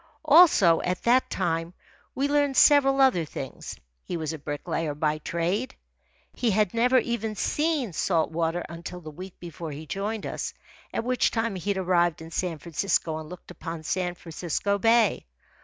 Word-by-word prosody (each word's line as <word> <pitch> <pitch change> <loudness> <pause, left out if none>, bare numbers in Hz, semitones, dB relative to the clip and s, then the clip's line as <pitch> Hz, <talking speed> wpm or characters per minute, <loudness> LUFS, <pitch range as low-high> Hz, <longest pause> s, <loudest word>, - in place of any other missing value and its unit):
Also, 290 - +6
at 180 0 -2
that 250 +2 +3
time, 165 +1 -2 0.4
we 275 +2 +1
learned 285 -2 +1
several 275 -2 +6
other 260 -11 +4
things. 135 -3 -7 0.3
He 175 - -4
was 160 -1 -3
a 160 - -7
bricklayer 150 +1 -3
by 150 0 0
trade. 180 - -2 0.6
He 240 - 0
had 210 -2 +2
never 245 +3 +3
even 225 -3 -1
seen 295 - 0
salt 165 -1 +1
water 165 +1 -1
until 170 +1 -8
the 155 -2 -9
week 185 +4 -10
before 170 -2 -7
he 150 +2 -8
joined 205 +5 -3
us, - - -4 0.4
at - - -2
which 250 +1 +2
time 225 -1 -1
he 185 +1 -5
had 200 - +1
arrived 175 -3 +2
in 160 0 -10
San 175 -1 -2
Francisco 165 0 -1
and 155 -1 -9
looked 180 0 -11
upon 165 -2 -7
San 180 +2 -2
Francisco 175 +4 -2
Bay. 225 - +3
180 Hz, 170 wpm, -26 LUFS, 165-230 Hz, 0.6 s, Also